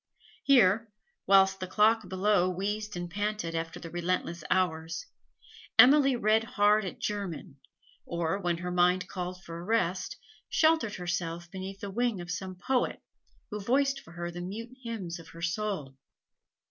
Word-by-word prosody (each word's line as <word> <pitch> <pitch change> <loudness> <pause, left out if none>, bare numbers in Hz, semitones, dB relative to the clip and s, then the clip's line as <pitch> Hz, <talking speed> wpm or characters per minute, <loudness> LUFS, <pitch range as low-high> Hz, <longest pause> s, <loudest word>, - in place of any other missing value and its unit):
Here, 225 -4 +4 0.4
whilst 195 0 +5
the 185 - -4
clock 215 +1 +3
below 190 0 +2
wheezed 205 +2 -3
and 175 0 -4
panted 205 -2 -2
after 165 0 -3
the 165 - -9
relentless 175 -1 -2
hours, 165 -2 0 0.7
Emily 275 0 +7
read 220 -1 +3
hard 215 -3 +3
at 185 - -6
German, 195 -9 -4 0.5
or, 170 +3 -2
when 175 -3 0
her 180 +1 -4
mind 180 +1 +3
called 180 -1 -5
for 170 0 -7
rest, 185 -3 0 0.3
sheltered 315 -10 +3
herself 175 -1 -3
beneath 190 +1 -7
the 200 - -5
wing 235 -1 0
of 175 0 -6
some 185 0 -4
poet, 250 +8 -1 0.5
who 210 - -3
voiced 275 +5 +2
for 170 - -15
her 175 0 -4
the 175 +1 -6
mute 225 +7 -6
hymns 200 -8 -5
of 165 - -12
her 165 - -12
soul. 175 -6 -2
190 Hz, 150 wpm, -29 LUFS, 175-215 Hz, 0.7 s, Emily